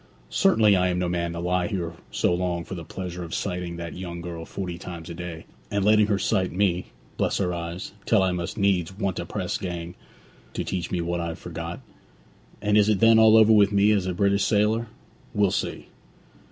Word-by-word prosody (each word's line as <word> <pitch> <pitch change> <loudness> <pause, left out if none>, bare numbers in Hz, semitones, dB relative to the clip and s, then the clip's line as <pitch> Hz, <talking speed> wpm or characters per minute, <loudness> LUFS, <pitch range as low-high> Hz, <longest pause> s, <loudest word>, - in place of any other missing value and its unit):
'Certainly, 110 - +4
I 90 0 +2
am 90 -1 0
no 90 0 0
man 85 -1 -1
to 85 - -5
lie 90 0 0
here 85 -4 -3 0.2
so - - +1
long 90 -1 -1
for 85 - -8
the 85 -3 -6
pleasure 90 +1 -6
of 85 - -5
sighting 90 -3 -3
that 85 0 -6
young 85 -1 -6
girl 85 -1 -6
forty 90 -2 -5
times 85 -1 -8
a - - -5
day, 85 -1 -7 0.2
and 100 -1 0
letting 105 0 +5
her 105 -2 +1
sight 95 -2 0
me 90 -1 0 0.3
bless - - +1
her 90 -3 0
eyes! 85 +1 -5 0.2
till 105 -4 +4
I 95 - +2
must 90 +4 -4
needs 95 -4 +1
want 100 -4 -1
a - - -5
press - - -3
gang 85 -1 -5 0.6
to - - -1
teach 90 -3 -3
me 90 - -1
what 85 +1 -2
I've 85 -1 -4
forgot. - - -6 0.8
And 105 0 +4
is 105 0 +4
it 105 -3 +2
then 115 0 +6
all 110 0 +7
over 110 0 +7
with 105 -1 +5
me 100 +1 +4
as 100 -3 +1
a 90 - -1
British 100 +1 +2
sailor? 110 +2 +2 0.5
We'll 100 -2 +3
see.' - - -3
90 Hz, 210 wpm, -25 LUFS, 85-100 Hz, 0.8 s, all